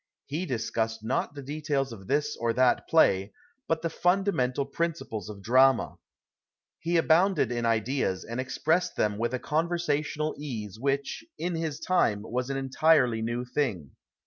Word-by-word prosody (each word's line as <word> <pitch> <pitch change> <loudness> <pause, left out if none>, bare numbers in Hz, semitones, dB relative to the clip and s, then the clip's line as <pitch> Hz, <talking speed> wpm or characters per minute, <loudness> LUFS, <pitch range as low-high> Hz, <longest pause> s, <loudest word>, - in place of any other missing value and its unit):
He 160 +6 -3
discussed 115 -2 -2
not 130 +5 -1
the 140 - -7
details 140 -2 -2
of 95 -4 -11
this 150 +1 0
or 115 0 0
that 125 +1 +2
play, 100 -11 +3 0.3
but 165 0 0
the 165 - 0
funda 190 +4 +2
mental 130 -2 0
principles 140 - -3
of 100 -2 -9
drama. 130 +2 +4 0.9
lie 170 +1 -1
abounded 170 - +3
in 120 -1 -1
ideas, 115 -3 0
and 115 +2 -5
expressed 160 +7 0
them 105 -1 0
witli 120 +2 -1
a - - +1
con\ersational 155 0 -1
ease 110 -8 -6
which, 140 - -1
in 175 +1 -2
his 160 -3 -3
time, 105 - +1
was 125 +3 -3
an 135 - -1
entirely 135 -3 +3
new 120 +2 -2
thing. 120 - -2
135 Hz, 155 wpm, -28 LUFS, 115-155 Hz, 0.9 s, drama